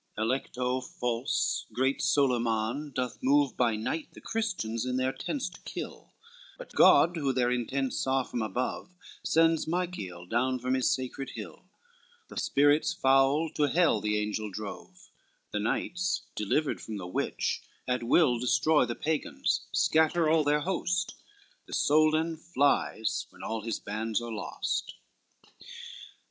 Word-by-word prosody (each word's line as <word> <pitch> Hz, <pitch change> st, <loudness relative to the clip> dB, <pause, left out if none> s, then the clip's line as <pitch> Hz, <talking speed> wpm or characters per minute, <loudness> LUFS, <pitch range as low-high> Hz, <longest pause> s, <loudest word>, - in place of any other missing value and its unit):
Alecto 125 Hz, +2 st, -1 dB
false 120 Hz, 0 st, -1 dB
great 130 Hz, +2 st, 0 dB
Solyman 120 Hz, +1 st, +1 dB
doth 125 Hz, -2 st, -3 dB
move 140 Hz, 0 st, +3 dB
By 120 Hz, -3 st, +2 dB
night 150 Hz, +9 st, -3 dB
the -, -, -12 dB
Christians 185 Hz, -, -2 dB
in 125 Hz, 0 st, -1 dB
their 130 Hz, 0 st, +1 dB
tents 280 Hz, -, -3 dB
to 180 Hz, -, -15 dB
kill: -, -, -8 dB, 0.4 s
But -, -, -11 dB
God 170 Hz, +1 st, +6 dB
who 140 Hz, -4 st, +1 dB
their 125 Hz, -1 st, +1 dB
intents 130 Hz, +2 st, -1 dB
saw 135 Hz, 0 st, +1 dB
from 120 Hz, -, -4 dB
above, 125 Hz, -, -3 dB, 0.3 s
Sends 165 Hz, -1 st, +3 dB
Michael 160 Hz, -, -3 dB
down 130 Hz, +6 st, 0 dB
from 130 Hz, +1 st, -1 dB
his 130 Hz, -1 st, +2 dB
sacred 130 Hz, +1 st, -2 dB
hill: -, -, -9 dB, 0.6 s
The -, -, -10 dB
spirits 145 Hz, +4 st, +3 dB
foul 135 Hz, +2 st, +3 dB
to 150 Hz, -, +2 dB
hell 160 Hz, -, +3 dB
the 105 Hz, 0 st, 0 dB
angels 105 Hz, -1 st, -2 dB
drove; 105 Hz, -2 st, -8 dB, 0.4 s
The 105 Hz, -, -1 dB
knights 180 Hz, -, -1 dB
delivered 135 Hz, +8 st, 0 dB
from 110 Hz, -2 st, -6 dB
the 95 Hz, -, -6 dB
witch, 90 Hz, -, -2 dB, 0.3 s
at 125 Hz, 0 st, 0 dB
will 120 Hz, +1 st, +3 dB
Destroy 150 Hz, +4 st, +3 dB
the 120 Hz, -, -4 dB
Pagans, 155 Hz, 0 st, -1 dB
scatter 160 Hz, +1 st, +3 dB
all 155 Hz, 0 st, +4 dB
their 150 Hz, +1 st, +2 dB
host: 185 Hz, +1 st, -1 dB, 0.5 s
The -, -, -9 dB
Soldan 155 Hz, +2 st, +3 dB
flies 145 Hz, -8 st, 0 dB
when -, -, -14 dB
all 110 Hz, 0 st, -3 dB
his 115 Hz, +1 st, -3 dB
bands 110 Hz, +2 st, -2 dB
are 120 Hz, 0 st, -6 dB
lost. 110 Hz, -, -3 dB
130 Hz, 140 wpm, -29 LUFS, 115-155 Hz, 0.6 s, God